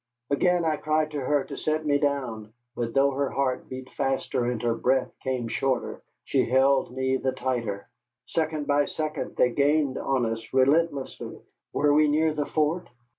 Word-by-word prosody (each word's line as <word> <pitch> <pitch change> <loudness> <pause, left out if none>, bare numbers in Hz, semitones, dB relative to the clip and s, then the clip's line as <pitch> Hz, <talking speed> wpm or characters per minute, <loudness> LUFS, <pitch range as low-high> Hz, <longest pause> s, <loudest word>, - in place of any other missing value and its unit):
Again 175 +4 +2
I 155 -1 +1
cried 155 0 0
to 150 - -3
her 145 +1 +1
to - - -8
set 155 0 -1
me 145 -1 +2
down; 120 -7 -2 0.2
but 115 0 -3
though 140 +1 +4
her 140 0 -1
heart 135 -2 -1
beat 130 0 -7
faster 135 -2 -1
and 120 -1 -1
her 120 -1 +2
breath 130 +3 +1
came 130 -3 -2
shorter, 130 +2 -1 0.2
she - - +1
held 130 0 +3
me 130 +1 0
the 130 0 -1
tighter. 115 -6 -3 0.4
Second 155 -1 -1
by 145 0 +3
second 155 +1 -4
they 125 - +3
gained 145 0 +2
on 135 -3 0
us, 115 0 -4
relentlessly. 140 +1 +1 0.3
Were 145 0 +2
we 150 +1 +5
near 155 +1 +2
the 150 -1 -2
fort? 160 +3 0
140 Hz, 175 wpm, -26 LUFS, 130-150 Hz, 0.4 s, we